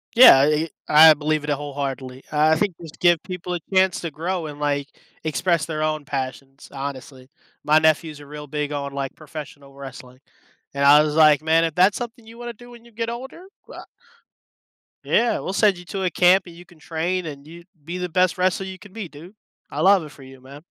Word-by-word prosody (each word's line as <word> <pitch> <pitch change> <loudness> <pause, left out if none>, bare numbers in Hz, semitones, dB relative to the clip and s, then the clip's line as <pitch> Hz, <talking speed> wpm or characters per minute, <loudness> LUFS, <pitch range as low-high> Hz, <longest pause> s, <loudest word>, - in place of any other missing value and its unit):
Yeah. 235 - +9
I 140 - +5
e 160 +2 -1 0.2
I 155 +1 +8
believe 155 0 -1
it 150 - -5
a 145 - +2
wholeheartedly. 135 -2 -6
Uh, 150 +1 +3
I - - +3
think 190 +1 -1
just 160 -2 -12
give 175 -2 +3
people 180 -1 -6
a 175 - -3
chance 190 -1 +3
to 170 - -5
grow 170 +3 -3
and, 145 -1 -9
like, 145 -1 -1 0.4
express 160 +1 0
their 155 -2 -4
own 155 -1 -1
passions, 135 0 -6
honestly. 135 -1 -8 0.3
My 155 +1 +4
nephew's 155 -1 +1
a 145 - -12
real 150 0 -9
big 150 0 -3
on, 140 -1 -4
like, 135 -1 -4
professional 145 -2 -10
wrestling. 130 -2 -11 0.5
And 140 - -2
I 145 +1 +8
was 150 0 -2
like, 155 -2 +5
"Man, 160 +1 +3
if 160 - -4
that's 185 +3 +4
something 235 -1 -7
you 230 +1 -13
wanna 240 0 -7
do 240 +2 -15
when 235 -1 -14
you 235 - -18
get 230 +1 -4
older? 265 +9 -8 0.2
Well - - -10
I" - - -12 1.2
Yeah. 235 0 +1
"We'll 185 - -4
send 200 -2 +3
you 175 - -11
to 195 +2 -5
a 185 - +1
camp, 180 +3 +4
and 170 - -12
you 175 +1 -14
can 170 -3 -21
train, 170 +3 -3
and 145 -2 -8
you 170 +2 -12 0.2
be 170 +4 -6
the 180 0 -3
best 180 +1 +1
wrestler 185 +1 0
you 190 -1 -8
could 205 -1 -15
be, 215 -5 -6
dude. 170 +8 -14 0.3
I - - -4
love 195 -2 +5
it 150 - -10
for 140 -2 -15
you, 130 0 -14
man." 140 +3 -13
155 Hz, 225 wpm, -22 LUFS, 145-185 Hz, 1.2 s, Yeah